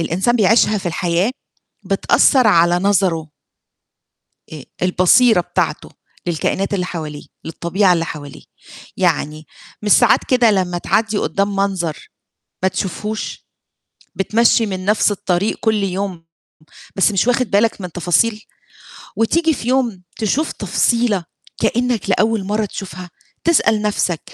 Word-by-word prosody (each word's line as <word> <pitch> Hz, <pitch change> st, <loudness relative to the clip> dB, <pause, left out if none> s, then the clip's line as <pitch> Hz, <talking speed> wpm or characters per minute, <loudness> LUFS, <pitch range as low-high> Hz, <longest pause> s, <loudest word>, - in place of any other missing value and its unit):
الإنسان 190 Hz, +9 st, 0 dB
بيعيشها 215 Hz, 0 st, +3 dB
في 190 Hz, -, -7 dB
الحياة 175 Hz, +4 st, 0 dB, 0.5 s
بتأثّر 260 Hz, -4 st, +3 dB
على 175 Hz, -4 st, +4 dB
نظره. 180 Hz, -5 st, 0 dB, 1.2 s
آآ 150 Hz, -4 st, -8 dB, 0.2 s
البصيرة 185 Hz, +4 st, +4 dB
بتاعته 175 Hz, -, -2 dB, 0.4 s
للكائنات 190 Hz, +4 st, -1 dB
اللي 180 Hz, -2 st, -1 dB
حواليه، 155 Hz, -4 st, -6 dB, 0.2 s
للطبيعة 180 Hz, +4 st, +1 dB
اللي 165 Hz, -2 st, 0 dB
حواليه، 145 Hz, -4 st, -9 dB, 0.5 s
يعني 155 Hz, +1 st, -1 dB, 0.4 s
مش 210 Hz, -1 st, +2 dB
ساعات 240 Hz, -3 st, +5 dB
كده 250 Hz, -3 st, +4 dB
لمّا 180 Hz, -3 st, 0 dB
تعدِّي 220 Hz, +3 st, 0 dB
قُدّام 200 Hz, 0 st, -1 dB
منظر 190 Hz, -5 st, -2 dB, 0.6 s
ما -, -, +4 dB
تشوفهوش، 210 Hz, +4 st, -5 dB, 0.7 s
بتمشّي 225 Hz, +3 st, +2 dB
من 185 Hz, -2 st, -5 dB
نَفْس 210 Hz, +1 st, +2 dB
الطريق 190 Hz, 0 st, -1 dB
كل 220 Hz, -2 st, +1 dB
يوم 190 Hz, -3 st, -4 dB, 0.7 s
بس 195 Hz, +2 st, +3 dB
مش 195 Hz, +3 st, 0 dB
واخد 245 Hz, -2 st, +1 dB
بالك 210 Hz, +1 st, +1 dB
من 180 Hz, -1 st, -6 dB
تفاصيل، 195 Hz, +6 st, +1 dB, 0.8 s
وتيجي 320 Hz, +8 st, +2 dB
في 240 Hz, -, -6 dB
يوم 245 Hz, -8 st, 0 dB, 0.2 s
تشوف 260 Hz, +9 st, -1 dB
تفصيلة 230 Hz, -6 st, 0 dB, 0.4 s
كإنك 240 Hz, -4 st, 0 dB
لأول 215 Hz, +1 st, +1 dB
مرّة 210 Hz, +2 st, -1 dB
تشوفها، 185 Hz, -3 st, -8 dB, 0.3 s
تسأل 225 Hz, -10 st, +2 dB
نَفْسك 195 Hz, -5 st, -1 dB
200 Hz, 120 wpm, -18 LUFS, 180-220 Hz, 1.2 s, ساعات